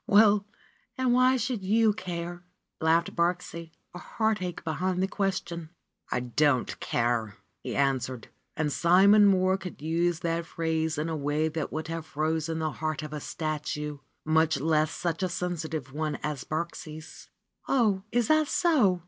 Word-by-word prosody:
"Well, 210 -2 +5 0.5
and 260 -2 +2
why 255 +1 +5
should 245 -3 -2
you 215 +2 +3
care?" 175 -3 -5 0.4
laughed 165 +1 +2
Birksie, 170 -1 -1 0.2
a 180 - -7
heartache 210 -6 -2
behind 180 +3 -1
the - - +2
question. 185 -5 -2 0.4
"I 125 - 0
don't 130 +2 +1
care 115 -3 -1
!" - - -48
he - - -4
returned. 130 -3 0 0.3
And 150 -2 0
Simon 200 +4 +6
Molir 185 0 +2
could 180 - -8
use 170 +2 0
that 165 0 -1
phrase 160 -1 -1
in 150 +2 -1
a 165 - -2
way 150 +2 0
that 155 -1 -3
would 155 +1 -4
have 165 -1 -4
frozen 160 +1 -1
the 160 -1 -1
heart 155 0 -3
of 155 0 -7
a 150 - -3
statue, 150 -1 -4 0.3
much 160 0 +3
less 155 +1 +2
such 165 +3 -3
a 185 - 0
sensitive 160 -6 -4
one 155 0 -2
as 150 -3 -3
Birksie's. 155 -1 -6 0.4
"Oh, 215 -8 +2
is 240 -2 +2
that 310 -1 +4
so 270 - +3
165 Hz, 155 wpm, -28 LUFS, 155-190 Hz, 0.5 s, Simon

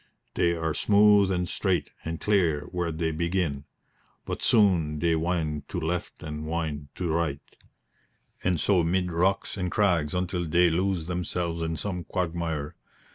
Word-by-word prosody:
They 85 0 +2
are 80 -2 -1
smooth 105 0 +5
and 90 -2 0
straight 95 0 -1
and 80 0 -4
clear 90 -8 +2
where 90 -2 -1
they 80 +1 -1
begin; 85 -3 -1 0.6
but - - -4
soon 90 -9 +3
they 85 +1 +2
wind 80 -3 -2
to 90 - -3
left 85 +1 -3
and 75 0 -5
wind 80 -3 -3
to 90 - -2
right, 80 -3 0 1.0
and 90 -3 +1
so 95 -1 +3
mid 90 +2 0
rocks 95 +5 0
and 90 -1 -1
crags 85 -6 +1
until 90 -1 -1
they 85 +1 +4
lose 90 0 0
themselves 85 -1 -2
in 80 0 -2
some 90 -2 -3
quagmire. 80 -3 -2
85 Hz, 150 wpm, -27 LUFS, 80-90 Hz, 1.0 s, smooth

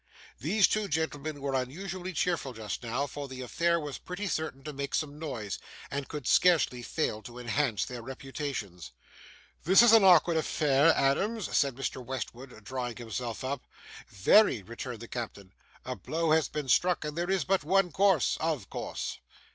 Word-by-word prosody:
These 195 - +4
two 215 -1 0
gentlemen 155 -2 -2
were 140 -1 -2
unusually 175 +8 -3
cheerful 165 -5 -1
just 110 -2 -5
now; 120 +4 -1
for 145 +1 -6
the 130 -1 -7
affair 170 +6 +1
was 145 -3 -6
pretty 180 +3 -5
certain 155 -7 -3
to 150 - -6
make 140 0 -3
some 150 -1 -2
noise, 115 - -4 0.3
and 140 0 -3
could 150 -4 -6
scarcely 165 -8 +4
fail 120 -4 -2
to 120 +2 -11
enhance 125 -1 0
their 125 -1 -7
reputations. 130 - -6 0.7
'This 190 +7 +7
is 235 -2 +7
an 225 -3 +8
awkward 175 -3 +6
affair, 150 -1 +3
Adams,' 195 +10 0
said 140 -3 +2
Mr. 130 -1 -4
Westwood, 125 -2 -7
drawing 125 0 -4
himself 120 0 -5
up. 135 +1 -4 0.4
'Very,' 115 - +4
returned 115 +2 -7
the 115 - -8
captain; 105 -6 -6 0.3
'a - - -4
blow 165 0 -1
has 160 0 +4
been 150 -2 -4
struck, 175 +6 +3
and 150 0 -4
there 175 +2 -2
is 190 -4 +2
but 190 +4 +1
one 185 +3 +2
course, 190 -3 +3
OF - - -2
course. - - -4
140 Hz, 170 wpm, -29 LUFS, 125-170 Hz, 0.7 s, an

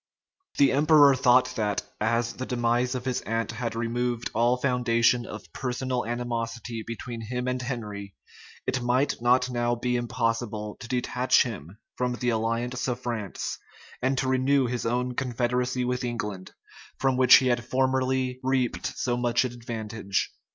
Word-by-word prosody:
[] 375 0 -29
The 140 - +5
emperor 145 0 +6
thought 125 -1 +4
that, 105 -2 0 0.2
as 115 +2 +1
the 130 - -5
demise 120 +1 +1
of 125 0 -4
his 130 -1 -1
aunt 115 0 -2
had 115 0 -4
removed 120 +1 -2
all 120 +2 +3
foundation 120 -2 +2
of 110 - -9
personal 125 -2 -2
animosity 115 -1 -3
between 115 +1 -6
him 125 +3 -3
and 125 0 -1
Henry, 105 - -5 0.5
it 130 - -1
might 125 +2 +1
not 125 +1 +3
now 120 0 0
be 125 +1 -1
impossible 115 -3 -2
to 120 - -8
detach 125 +1 +2
him 100 - -7 0.2
from 125 0 0
the 125 0 -1
alliance 115 +3 -1
of 125 -1 -2
France, 115 -6 -4 0.4
and 130 +1 +1
to 130 - 0
renew 130 +1 +3
his 120 -1 -2
own 125 +1 0
confederacy 125 0 -1
with 125 0 -1
England, 105 -6 -4 0.4
from 135 -1 +1
which 130 0 +8
he 130 - +5
had 120 -1 +1
formerly 130 0 0
reaped 130 -2 -1
so 120 -1 0
much 120 +1 +1
advantage. 115 -4 -3
120 Hz, 155 wpm, -27 LUFS, 115-125 Hz, 0.5 s, which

